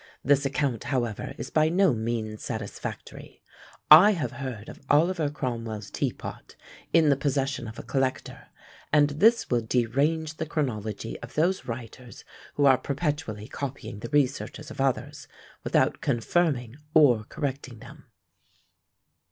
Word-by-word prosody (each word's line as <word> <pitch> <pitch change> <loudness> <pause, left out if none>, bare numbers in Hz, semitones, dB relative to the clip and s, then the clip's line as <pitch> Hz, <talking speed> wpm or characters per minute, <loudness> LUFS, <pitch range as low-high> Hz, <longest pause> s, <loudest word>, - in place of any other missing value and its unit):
This 140 +1 +3
account, 135 -5 -2
however, 120 -4 -2
is - - -6
by 155 0 +3
no 180 -2 +3
means 110 -1 -3
satisfactory. 110 -3 -7 0.5
I 185 +8 +10
have 145 - -3
heard 120 -5 -6
of - - -11
Oliver 160 +1 +3
Cromwell's 115 -7 -5
tea - - -1
pot - - -10 0.4
in 160 -2 +5
the 140 - +5
possession 135 -3 -1
of 110 - -9
a - - -7
collector, 135 -1 -2 0.4
and 145 -1 +4
this 220 - +3
will 120 -1 +2
derange 140 +8 0
the 160 - -3
chronology 110 -8 -3
of - - -11
those 180 +5 +1
writers 120 +1 -8 0.3
who 145 - +2
are 130 -2 +6
perpetually 140 -7 -3
copying 135 -7 -6
the 120 - -7
researches 145 +1 -1
of - - -5
others, 135 -2 -2 0.4
without - - +1
confirming 125 -1 0 0.2
or 125 -8 +6
correcting 135 -3 -5
them. - - -14
135 Hz, 135 wpm, -26 LUFS, 115-150 Hz, 0.5 s, I